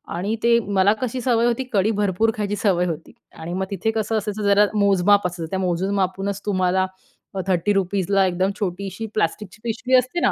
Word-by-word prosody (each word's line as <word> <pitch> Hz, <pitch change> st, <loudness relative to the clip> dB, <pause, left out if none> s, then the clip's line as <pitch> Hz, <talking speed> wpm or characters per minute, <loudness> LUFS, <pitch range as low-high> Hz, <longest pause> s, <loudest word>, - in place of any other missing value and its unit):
आणि 200 Hz, +6 st, -1 dB
ते 235 Hz, 0 st, +5 dB
मला 200 Hz, -2 st, +2 dB
कशी 255 Hz, 0 st, -2 dB
सवय 235 Hz, -1 st, +2 dB
होती, 240 Hz, +2 st, +1 dB
कढी 205 Hz, +1 st, +2 dB
भरपूर 205 Hz, +3 st, +1 dB
खायची 205 Hz, -1 st, -1 dB
सवय 185 Hz, -4 st, +1 dB
होती 165 Hz, -2 st, -5 dB, 0.3 s
आणि 165 Hz, +2 st, -5 dB
मग 190 Hz, +1 st, -1 dB
तिथे 200 Hz, +3 st, -1 dB
कसं 220 Hz, 0 st, -1 dB
असायचं, 210 Hz, 0 st, -3 dB
जरा 200 Hz, +1 st, +5 dB
मोज-माप 200 Hz, 0 st, +4 dB
असायचं. 170 Hz, -2 st, -6 dB
त्या 190 Hz, -, -2 dB
मोजून-मापूनच 190 Hz, +2 st, -1 dB
तुम्हाला 185 Hz, -2 st, +1 dB, 0.6 s
₹30ला 195 Hz, +1 st, +1 dB
एकदम 185 Hz, +1 st, 0 dB
छोटीशी 195 Hz, +2 st, -4 dB
प्लास्टिकची 210 Hz, +1 st, -2 dB
पिशवी 235 Hz, +3 st, 0 dB
असते 255 Hz, +7 st, 0 dB
ना -, -, +3 dB
200 Hz, 170 wpm, -22 LUFS, 185-215 Hz, 0.6 s, ते